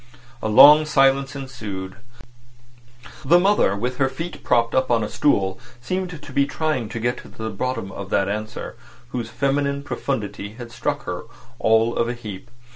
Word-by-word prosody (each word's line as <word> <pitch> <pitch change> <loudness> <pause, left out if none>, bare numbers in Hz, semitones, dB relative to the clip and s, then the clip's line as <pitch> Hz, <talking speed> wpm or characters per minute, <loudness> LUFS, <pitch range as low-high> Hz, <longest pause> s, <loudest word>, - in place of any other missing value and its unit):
A - - -1
long 150 +8 +8
silence 135 -1 +3
ensued. 110 -9 -6 1.3
The 170 +6 +5
mother, 190 - +3
with 125 +5 -3
her 135 -1 +2
feet 155 +4 -7
propped 115 -1 +2
up 130 0 +2
on 115 -2 +2
a - - -2
stool, 95 -10 +1 0.2
seemed 180 +5 -3
to 140 - -10
be 140 +1 +2
trying 150 -10 -2
to 115 - -5
get 120 +2 -1
to - - -11
the 110 0 -6
bottom 115 -1 -3
of 95 0 -7
that 95 - +1
answer, 110 +2 -5 0.3
whose 120 -2 -4
feminine 140 +4 0
profundity 105 -8 -4
had 120 0 -9
struck - - -2
her - - -5 0.3
all 110 +1 +3
of 115 - 0
a 120 - -3
heap. 105 -2 -9
125 Hz, 170 wpm, -22 LUFS, 110-140 Hz, 1.3 s, long